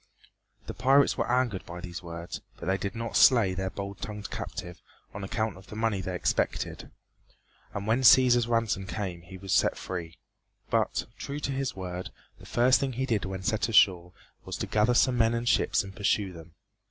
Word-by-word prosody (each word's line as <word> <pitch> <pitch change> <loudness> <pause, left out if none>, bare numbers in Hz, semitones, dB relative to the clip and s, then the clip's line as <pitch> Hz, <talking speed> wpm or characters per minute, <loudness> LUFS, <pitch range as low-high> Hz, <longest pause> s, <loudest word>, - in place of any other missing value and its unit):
The - - -6
pirates 135 +2 +4
were - - -1
angered 125 -6 +1
by 85 +1 -7
these 90 -1 -7
words, 85 0 -7 0.2
but - - -8
they 95 +2 0
did 100 +3 -4
not 115 0 -4
slay 115 -8 +6
their 95 0 -2
bold 100 +1 -7
tongued 105 -1 -6
captive 90 -1 -6 0.3
on 100 - -6
account 110 +1 -2
of 95 - -15
the - - -9
money 110 -3 0
they 95 0 -4
expected, - - -1 0.9
and 100 0 -3
when 115 +4 +2
Cæsar's 120 -2 +6
ransom 115 -5 0
came 90 -2 -4
he 90 +3 -11
was 95 0 -3
set - - +3
free. 85 -4 -6 0.5
But, - - +1
true 140 +1 -5
to 140 - -2
his 135 -1 -2
word, 90 -1 -5 0.3
the - - -13
first 125 +2 +4
thing 135 -2 -2
he 130 +3 -1
did 110 -6 0
when 95 0 -5
set 110 +2 0
ashore 90 -5 +4 0.3
was - - -5
to - - -2
gather 110 +3 +2
some 125 0 +3
men 115 0 +3
and 115 +1 -3
ships - - +2
and 95 -1 -10
pursue 100 -2 0
them. 80 -1 -13
100 Hz, 195 wpm, -28 LUFS, 95-120 Hz, 0.9 s, slay